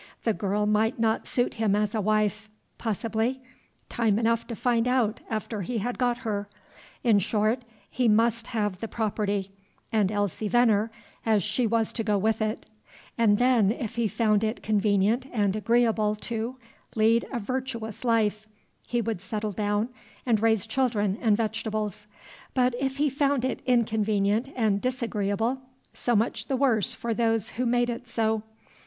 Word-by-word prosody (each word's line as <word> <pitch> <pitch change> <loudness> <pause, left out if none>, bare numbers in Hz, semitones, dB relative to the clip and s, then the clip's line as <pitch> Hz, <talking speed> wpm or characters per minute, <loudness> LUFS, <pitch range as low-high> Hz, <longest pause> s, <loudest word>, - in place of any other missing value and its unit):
The 225 - +2
girl 205 +1 -1
might 215 +2 +2
not 225 -1 0
suit 245 0 0
him 220 -3 +1
as 210 0 0
a 220 - 0
wife. 215 +1 0 0.3
Possibly. 225 +3 -1 0.5
Time 220 -4 +1
enough 230 0 +1
to 235 - -5
find 235 0 +1
out 250 -4 +1
after 215 -1 -3
he 230 +6 -3
had 240 +4 -3
got 245 -1 +2
her. 205 -2 -2 0.5
In 225 -4 +5
short, 215 +5 +1 0.3
he 250 -1 0
must 230 +1 +2
have 205 -5 -2
the 225 - -4
property, 205 -3 -2 0.4
and 210 -4 +2
Elsie 205 0 -1
Venner, 225 -2 +3 0.3
as 215 -4 +2
she 215 +5 0
was 225 0 0
to 225 - -2
go 210 -1 +1
with 220 +2 +1
it, 215 +1 -2 0.5
and 215 -3 +4
then, 245 -5 +4
if 230 -2 -4
he 235 -1 +1
found 215 0 +2
it 220 +2 -2
convenient 210 +3 +2
and 205 -4 +1
agreeable 220 -1 +2
to, 230 +3 -4 0.4
lead 225 +1 +3
a 255 - -2
virtuous 230 -2 -4
life, 215 -3 +1 0.4
he 240 -1 0
would 225 -5 -3
settle 215 -2 -3
down 205 +2 0 0.4
and 225 -4 +2
raise 220 -2 +2
children 220 -5 0
and 215 -4 +3
vegetables; 215 -2 -3 0.5
but 250 -1 +3
if 270 0 -1
he 295 +1 +2
found 275 -2 +1
it 260 - -2
inconvenient 220 0 +1
and 215 -4 +1
disagreeable, 235 -1 -1 0.3
so 240 - 0
much 220 +3 0
the 265 - 0
worse 245 -7 +2
for 235 -1 -2
those 225 -2 0
who 245 +4 -1
made 240 0 +2
it 240 +1 -7
so. 220 -1 0
220 Hz, 160 wpm, -27 LUFS, 210-235 Hz, 0.5 s, In